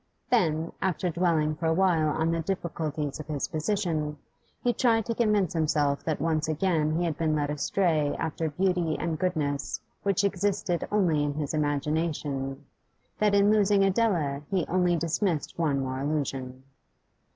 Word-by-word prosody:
Then, 165 -9 +2
after 180 -1 0
dwelling 160 -3 +1
for 160 +2 -3
awhile 160 -2 +3
on 160 +2 0
the 165 - 0
difficulties 160 -4 -3
of 155 - -7
his 150 -3 -2
position, 155 -3 -1 0.5
he 245 - +2
tried 225 -2 +2
to 230 - -1
convince 210 -6 +1
himself 150 -3 +1
that 160 -2 -1
once 155 0 0
again 155 -1 +1
he 175 - 0
had 165 -4 -2
been 155 -2 +1
led 145 -1 0
astray 150 0 +1
after 160 0 -2
beauty 175 0 0
and 160 -2 -2
goodness 145 -7 -1 0.2
which 200 -1 +1
existed 195 -2 0
only 175 -8 +2
in 145 -1 -2
his 150 -1 -3
imagination, 145 -2 -1 0.5
that 210 -1 +3
in 200 +1 +5
losing 205 -2 +4
Adela 185 -9 +1
he 185 -5 0
only 180 0 +2
dismissed 165 0 -1
one 145 -5 +1
more 130 0 -3
illusion. 135 -3 -3
160 Hz, 150 wpm, -27 LUFS, 150-185 Hz, 0.5 s, in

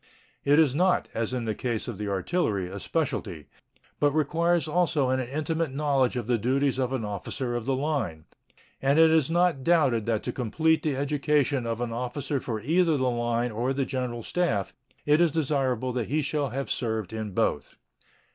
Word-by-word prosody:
It 145 +1 +4
is 155 -5 +4
not, 180 +5 +2
as 115 0 -2
in 125 -2 -2
the 110 - -1
case 115 -1 -3
of 115 -5 -6
the 105 - -3
artillery, 100 - -1
a 100 +3 -7
specialty, 100 - -3 0.5
but 145 - +4
requires 165 +3 +1
also 155 -4 +1
an 130 0 +1
intimate 155 +4 -2
knowledge 140 -4 +1
of 120 -3 -2
the 120 0 +1
duties 135 +4 +1
of 130 -1 0
an 130 -5 -2
officer 120 +5 -4
of 120 -2 -3
the 135 - +2
line, 130 - -2 0.6
and 140 +2 +2
it 160 0 +6
is 160 -3 +3
not 170 -5 +2
doubted 135 -10 +2
that 110 -2 0
to 125 - -2
complete 155 +7 +1
the 150 -3 -1
education 140 -2 +1
of 115 0 -2
an 120 -1 -2
officer 125 +4 -2
for 115 -3 -4
either 165 - +2
the 130 -1 +1
line 120 0 -1
or 120 +5 -1
the 135 0 0
general 125 -3 -3
staff 110 - -1 0.3
it 150 +3 +4
is 170 -2 +4
desirable 135 -5 0
that 120 -3 -2
he 150 +2 +1
shall 145 0 -1
have 135 +3 -3
served 110 -4 -2
in 110 -3 -4
both. 75 - -1
130 Hz, 190 wpm, -27 LUFS, 115-150 Hz, 0.6 s, it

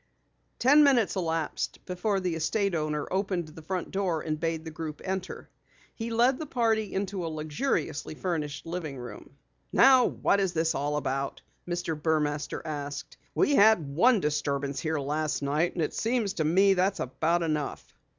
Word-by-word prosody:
Ten 290 +4 +6
minutes 255 -7 +3
elapsed 165 -4 -2
before 195 +2 -1
the 180 -2 -1
estate 195 +5 0
owner 150 -2 -1
opened 190 -4 -1
the 155 +1 -11
front 180 +3 -4
door 185 -5 0
and 155 -1 -3
bade 165 0 -2
the 160 - -6
group 155 -1 -6
enter. 190 -1 -4 0.5
He 230 0 -5
led 240 +3 +3
the 315 - -5
party 225 -5 +1
into 195 -1 -2
a - - -2
luxuriously 155 - -2
furnished 150 -4 -3
living 165 -5 -5
room. 125 -1 -9 0.4
"Now 260 -1 +6
what 200 - +1
is 190 -3 0 0.2
all 145 +1 -1
this?" 135 -1 -1 0.4
Mr. 175 -3 -3
Burmaster 150 -2 -1
asked. 145 -2 -5 0.2
"We 290 - +3
had 200 - +5
one 235 +6 +5
disturbance 140 -2 -1
here 160 -1 -1
last 145 -1 -1
night 150 +5 +1
and 170 - -1
it - - -2
seems 225 -4 0
to 160 - -1
me 190 +6 +4
that's 190 +1 +1
about 165 +6 0
enough." 155 -3 -3
165 Hz, 160 wpm, -28 LUFS, 150-200 Hz, 0.5 s, Ten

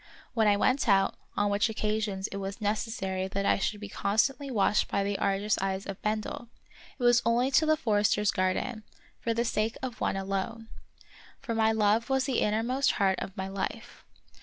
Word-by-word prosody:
When 220 -2 +3
I 205 -1 +4
went 255 +3 +2
out, 195 -1 +4 0.2
on 205 0 +2
which 205 +3 +2
occasions 210 -3 -2
it 195 - -6
was 195 +1 -5
necessary 205 -3 -2
that 200 +1 -2
I - - +3
should 210 +1 -1
be 205 - -7
constantly 245 +8 0
watched 210 -3 +2
by 200 - 0
the 200 0 -1
Argus 200 +1 +1
eyes 190 0 -2
of 195 -1 -7
Bendel, 215 +2 -3 0.5
it 250 - -6
was 240 -1 +5
only 240 +3 +2
to 310 +4 +4
the 310 0 +4
forester's 210 -5 +2
garden, 185 +5 -1 0.4
for 230 -1 -1
the 235 +1 +1
sake 220 0 -1
of 250 -2 -5
one - - 0
alone; 195 +4 -3 0.7
for 230 - -4
my 220 0 +3
love 220 +2 +2
was 265 -1 +2
the 260 -2 0
innermost 235 +6 +1
heart 190 -1 +1
of 190 - -7
my 190 0 -3
life. 195 0 -5
210 Hz, 185 wpm, -29 LUFS, 195-230 Hz, 0.7 s, was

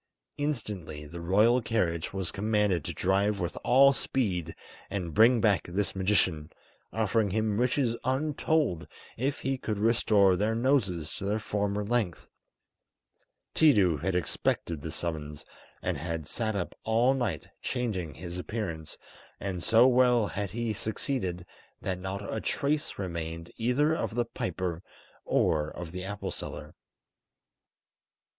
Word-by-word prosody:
Instantly 100 - -3
the 85 +3 -8
royal 105 +8 +4
carriage 90 -8 0
was 95 -3 -3
commanded 105 -5 +1
to - - -3
drive 100 +2 +1
with 85 -3 -2
all 135 +3 +6
speed 100 - -1 0.3
and 90 -5 -3
bring 115 +3 +6
back 105 -4 +2
this 95 +2 -1
magician, 95 -5 +1 0.4
offering 110 -1 +1
him 110 +1 0
riches 125 -1 +2
untold 140 - 0 0.3
if 135 +4 -1
he 135 -1 -1
could 110 -4 -2
restore 105 -3 +4
their 105 +4 +1
noses 105 - +1
to - - -6
their 105 +2 +1
former 105 -1 -1
length. 110 -6 -1 1.3
Tiidu 100 - +5
had 95 +1 0
expected 85 -2 -1
this 80 +1 -5
summons, 75 -3 -4 0.4
and - - -1
had 80 0 -4
sat 110 +6 -2
up 95 -3 -2
all 115 +4 +3
night 120 -12 -2
changing 100 - -2
his 85 +4 -6
appearance, 90 -6 -4 0.4
and 95 -2 -3
so 115 +2 +6
well 125 -3 +4
had 100 -1 -3
he 115 +2 -2
succeeded 100 -5 -3 0.3
that 95 -1 -3
not 95 +2 -4
a 110 - -2
trace 145 +1 -1
remained 85 -3 -5
either 125 +7 +2
of 115 - -2
the 120 -1 +1
piper 90 -6 -3 0.4
or 75 -1 +2
of 85 -1 -7
the 90 +1 -5
apple 100 +1 -4
seller. 75 +1 -7
100 Hz, 135 wpm, -29 LUFS, 85-115 Hz, 1.3 s, all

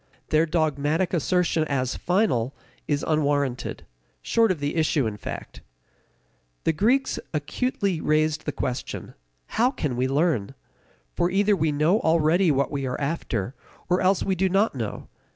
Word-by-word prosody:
Their 155 +2 +3
dogmatic 155 +2 0
assertion 175 0 +1
as 130 -4 -1
final 160 - +1 0.3
is 145 -1 0
unwarranted, 145 -5 0 0.4
short 230 -1 +3
of 175 - -2
the 145 +2 -2
issue, 155 -4 +2
in 110 -2 -2
fact. 105 - -7 1.0
The - - +2
Greeks 245 - +2 0.2
acutely 190 - -1
raised 155 0 +1
the - - +1
question: 130 -3 -4 0.5
How 245 - +5
can 150 - -3
we 125 +2 +1
learn? 140 - 0 0.6
For 175 - +1
either 205 +2 +3
we 160 -4 +1
know 155 +8 +3
already 165 +2 +3
what 140 -1 +1
we 140 -2 -2
are 125 - -3
after, 135 - -2 0.4
or 180 +1 +2
else 190 +1 +3
we 190 - 0
do 190 +1 +1
not 195 +4 +2
know. 115 -6 -5
155 Hz, 150 wpm, -25 LUFS, 140-180 Hz, 1.0 s, How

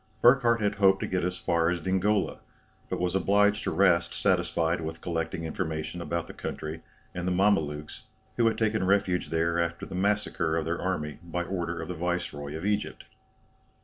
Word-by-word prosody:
"] - - -34
Burckhardt 120 -2 +5
had 105 - +1
hoped 95 0 +6
to - - 0
get 90 -2 -1
as 90 +1 -1
far 85 -1 +1
as 90 0 0
Dingola, 95 +4 +1 0.5
but - - -2
was 90 0 0
obliged 105 +2 +3
to - - 0
rest 85 -3 +3
satisfied 85 -3 +1
with 80 +1 -5
collecting 80 -1 -3
information 80 +1 -3
about 85 0 -2
the - - -10
country 80 +1 -5 0.3
and 90 0 -3
the - - +1
Mamelukes, 80 -6 0 0.3
who 115 -1 +3
had 115 - +1
taken 110 -3 +1
refuge 95 -5 +2
there 85 +1 +1
after 85 0 -2
the - - -9
massacre 95 -4 0
of 80 - -1
their 85 +1 -2
army 75 -5 -2
by 85 0 -3
order 85 -2 -3
of - - -5
the 90 - -3
viceroy 85 -4 -3
of 80 +4 -5
Egypt. 105 0 -1
90 Hz, 185 wpm, -28 LUFS, 80-95 Hz, 0.5 s, hoped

